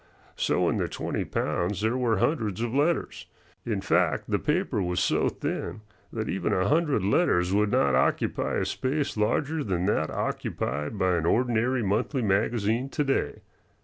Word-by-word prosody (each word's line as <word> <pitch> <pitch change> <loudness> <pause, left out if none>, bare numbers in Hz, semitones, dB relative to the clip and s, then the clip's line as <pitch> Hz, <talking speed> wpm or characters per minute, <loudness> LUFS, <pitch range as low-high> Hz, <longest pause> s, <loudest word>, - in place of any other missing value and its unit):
So - - +1
in - - +1
the - - 0
twenty - - -3
pounds 90 +5 -1
there 110 +3 +1
were 120 -4 +1
hundreds 110 - 0
of 120 0 -2
letters. 150 +5 0 0.4
In 105 -4 -1
fact, 85 -5 +1
the 100 - +2
paper 150 - 0
was 90 -1 -1
so - - +2
thin 110 - -4 0.3
that - - -3
even - - -1
a 95 +1 +1
hundred 150 - +2
letters 95 - +2
would 105 +1 +3
not 70 -9 +2
occupy 65 - +1
a - - 0
space 140 +3 -2
larger 140 +9 0
than 90 -5 -1
that 80 -6 +1
occupied 75 - -3
by 95 -2 +2
an 85 0 -1
ordinary 120 +2 +1
monthly 115 +6 0
magazine 110 +4 +1
to 150 - -1
day. 135 - -1
105 Hz, 165 wpm, -27 LUFS, 95-130 Hz, 0.4 s, would